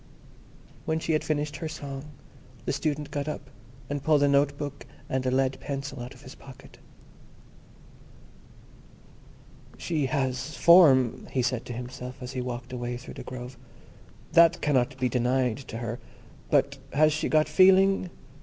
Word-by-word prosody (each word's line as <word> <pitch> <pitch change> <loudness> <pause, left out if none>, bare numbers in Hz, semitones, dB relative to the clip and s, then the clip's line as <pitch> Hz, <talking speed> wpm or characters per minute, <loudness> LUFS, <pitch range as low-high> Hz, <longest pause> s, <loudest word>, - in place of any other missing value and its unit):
When 160 - 0
she 160 0 -1
had 155 - +1
finished 150 -1 -2
her 160 - -4
song 140 -2 -7 0.6
the - - -1
Student 150 -1 -2
got 145 0 -3
up, 140 -3 -6 0.4
and 145 +1 -3
pulled 150 -1 +3
a - - +4
note 140 0 +2
book 145 -1 -6 0.2
and 130 0 -1
a - - +3
lead 130 +1 +1
pencil 140 -2 -5
out 125 +2 -8
of 125 - -17
his 130 - -10
pocket. 135 -2 -15 3.0
"She 155 -5 -1
has 130 +1 -2
form," 140 -9 +6
he 130 - 0
said 125 -1 -1
to 120 - -6
himself, 125 +1 -7
as 125 0 -7
he 130 -1 -3
walked 125 0 -6
away 120 0 -3
through 120 - -10
the - - -8
grove—"that 130 +6 -1
cannot 135 -2 +1
be 130 - +2
denied 125 -1 +1
to 115 - -6
her; 115 0 -4 0.5
but 140 0 +2
has 155 +2 +4
she 155 - -1
got 155 -1 +3
feeling? 190 +3 +5
135 Hz, 155 wpm, -27 LUFS, 125-150 Hz, 3.0 s, form